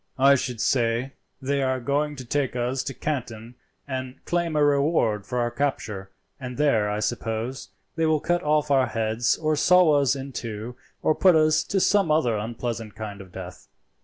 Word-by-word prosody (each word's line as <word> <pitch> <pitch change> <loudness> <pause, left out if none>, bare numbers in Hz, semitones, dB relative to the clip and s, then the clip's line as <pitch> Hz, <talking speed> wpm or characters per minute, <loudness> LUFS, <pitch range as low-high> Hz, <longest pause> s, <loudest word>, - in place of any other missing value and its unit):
"I 135 +1 +6
should 125 -3 -2
say 120 +2 +1 0.3
they 140 +1 -1
are 130 -1 0
going 145 +4 -1
to 130 -2 -8
take 135 +1 -1
us 125 +2 -1
to 135 - -4
Canton 120 -6 -4 0.3
and 130 -1 -4
claim 170 -2 -1
a 150 - +3
reward 140 -8 +2
for 125 - -3
our 120 -1 0
capture, 110 -7 -3 0.3
and 125 -2 -7
there 115 -8 +2
I 105 0 -2
suppose 115 +4 -3 0.3
they 165 -1 +1
will 155 -1 +2
cut 175 +3 0
off 150 -1 +1
our 135 -2 +4
heads 115 +1 0
or 155 -1 0
saw 180 +1 +5
us 140 0 +2
in 135 0 -6
two, 115 0 -6 0.3
or - - +3
put 185 +2 +4
us 155 0 +3
to 195 - 0
some 195 -2 +3
other 150 -7 +2
unpleasant 115 0 -4
kind 105 -2 -7
of 95 -1 -13
death. 90 -1 -9
130 Hz, 185 wpm, -25 LUFS, 115-150 Hz, 0.3 s, I